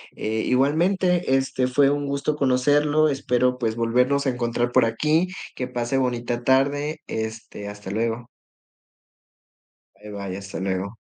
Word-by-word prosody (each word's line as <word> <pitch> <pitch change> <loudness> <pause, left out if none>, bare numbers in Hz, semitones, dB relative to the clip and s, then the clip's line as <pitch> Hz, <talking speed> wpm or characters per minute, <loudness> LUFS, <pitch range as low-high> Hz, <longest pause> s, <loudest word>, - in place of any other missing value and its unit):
eh, 110 +1 -2
igualmente, 170 +3 +2
este, 135 -1 0
fue 135 +2 +3
un 145 0 -1
gusto 140 +2 -1
conocerlo. 145 +3 +3
Espero, 125 -2 +1
pues, 115 -3 -1
volvernos 125 +5 +1
a - - +4
encontrar 120 -1 -1
por 125 -1 +4
aquí. 150 +10 +1 0.3
Que 125 - -3
pase 125 +1 -2
bonita 120 -2 -1
tarde, 140 +4 +1
este, 110 -2 -5
hasta 105 -1 -8
luego. 115 +3 -2 1.7
Bye, 105 0 -12
bye, 100 -2 -5
hasta 100 0 -7
luego. 95 +2 -3
125 Hz, 135 wpm, -23 LUFS, 115-140 Hz, 1.7 s, a